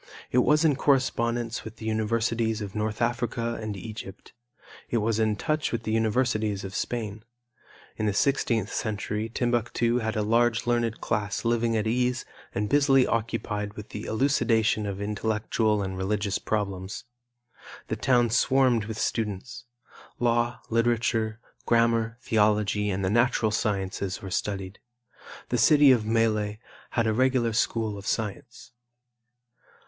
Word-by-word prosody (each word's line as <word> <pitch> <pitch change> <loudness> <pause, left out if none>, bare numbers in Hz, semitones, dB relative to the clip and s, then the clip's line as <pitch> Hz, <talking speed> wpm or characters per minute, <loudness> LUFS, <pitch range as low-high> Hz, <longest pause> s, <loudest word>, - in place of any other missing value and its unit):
It 125 - +4
was 150 +5 +4
in 150 -3 +4
correspondence 120 -4 +1
with 110 0 -9
the 110 - -9
universities 110 0 0
of 100 -2 -6
North 110 +1 -1
Africa 115 -1 -1
and 105 -2 -4
Egypt. 105 -1 -9 0.6
It 120 - +1
was 110 0 0
in 110 -1 +2
touch 155 +7 -1
with 115 -1 -2
the 110 - -2
universities 110 -2 +1
of 95 0 -6
Spain. 110 -2 -3 0.7
In 110 - -1
the 105 - +1
sixteenth 115 -3 +1
century 105 0 -2
Timbuctu 120 0 0
had 110 -1 -2
a 105 - 0
large 115 +1 +2
learned 120 -2 0
class 105 -1 -2
living 115 -1 +1
at 105 - -1
ease 125 +2 0 0.3
and 105 +1 0
busily 135 0 +4
occupied 105 -2 -2
with 105 0 -9
the 105 - -6
elucidation 110 -4 +1
of 100 -1 -4
intellectual 105 0 0
and 95 -1 -4
religious 100 +1 -1
problems. 100 -2 -3 0.8
The - - -2
town 120 -3 +2
swarmed 125 -2 +3
with 110 0 -6
students. 115 +1 -3 0.5
Law, 120 0 +1
literature, 115 -1 +1 0.3
grammar, 115 0 +2
theology 105 -1 +2
and 95 0 -1
the 95 - 0
natural 120 -1 +2
sciences 95 -3 -2
were 95 - -8
studied. 95 0 -3 0.7
The - - 0
city 145 -3 +6
of 115 -4 +2
Melle 110 -2 +1 0.3
had 115 - 0
a 110 - +2
regular 125 -1 +2
school 110 -2 0
of 100 - -10
science. 110 +1 -4
110 Hz, 140 wpm, -26 LUFS, 105-120 Hz, 0.8 s, city